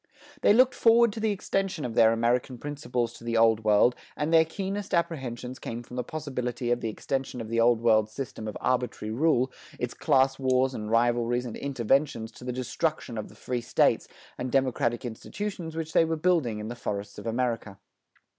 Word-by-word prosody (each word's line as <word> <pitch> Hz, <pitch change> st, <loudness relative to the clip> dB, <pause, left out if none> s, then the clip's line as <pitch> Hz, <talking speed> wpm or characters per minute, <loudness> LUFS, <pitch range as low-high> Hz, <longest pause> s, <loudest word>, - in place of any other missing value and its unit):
They -, -, +5 dB
looked 255 Hz, +4 st, +5 dB
forward 230 Hz, -1 st, +5 dB
to 225 Hz, -, -6 dB
the 220 Hz, 0 st, +1 dB
extension 195 Hz, -4 st, -1 dB
of 120 Hz, -, -4 dB
their 110 Hz, 0 st, +6 dB
American 120 Hz, +2 st, 0 dB
principles 125 Hz, -4 st, -3 dB
to -, -, -13 dB
the 115 Hz, -1 st, -1 dB
Old 115 Hz, -1 st, +4 dB
World 105 Hz, +3 st, +5 dB, 0.2 s
and 150 Hz, +3 st, -1 dB
their 160 Hz, 0 st, +7 dB
keenest 195 Hz, +3 st, -3 dB
apprehensions 130 Hz, -7 st, -3 dB
came 115 Hz, +1 st, -6 dB
from 125 Hz, -, -11 dB
the 125 Hz, -, -1 dB
possibility 125 Hz, -4 st, -3 dB
of 120 Hz, -, +1 dB
the 115 Hz, -, -2 dB
extension 135 Hz, +3 st, -3 dB
of 110 Hz, -2 st, -6 dB
the 115 Hz, 0 st, 0 dB
Old 115 Hz, 0 st, +4 dB
World's 110 Hz, -2 st, +3 dB
system 110 Hz, -3 st, -6 dB
of 105 Hz, -, -5 dB
arbitrary 125 Hz, -4 st, -1 dB
rule, 130 Hz, -1 st, +2 dB, 0.3 s
its -, -, -2 dB
class 135 Hz, 0 st, +2 dB
wars 130 Hz, 0 st, +2 dB
and 105 Hz, -3 st, -5 dB
rivalries 120 Hz, +1 st, +2 dB
and 120 Hz, -, -6 dB
interventions 135 Hz, -3 st, 0 dB
to 120 Hz, -, -14 dB
the 125 Hz, -, -3 dB
destruction 130 Hz, +1 st, -2 dB
of 110 Hz, -, -5 dB
the -, -, -16 dB
free 120 Hz, +3 st, -3 dB
States 115 Hz, -, +2 dB, 0.3 s
and 125 Hz, 0 st, -3 dB
democratic 130 Hz, -3 st, +1 dB
institutions 165 Hz, -, -5 dB
which 160 Hz, -1 st, -4 dB
they -, -, +6 dB
were 165 Hz, 0 st, 0 dB
building 155 Hz, -9 st, +1 dB
in 105 Hz, 0 st, -5 dB
the 120 Hz, -, -5 dB
forests 100 Hz, -3 st, -5 dB
of -, -, -7 dB
America. 115 Hz, -4 st, -2 dB
125 Hz, 195 wpm, -27 LUFS, 115-155 Hz, 0.3 s, their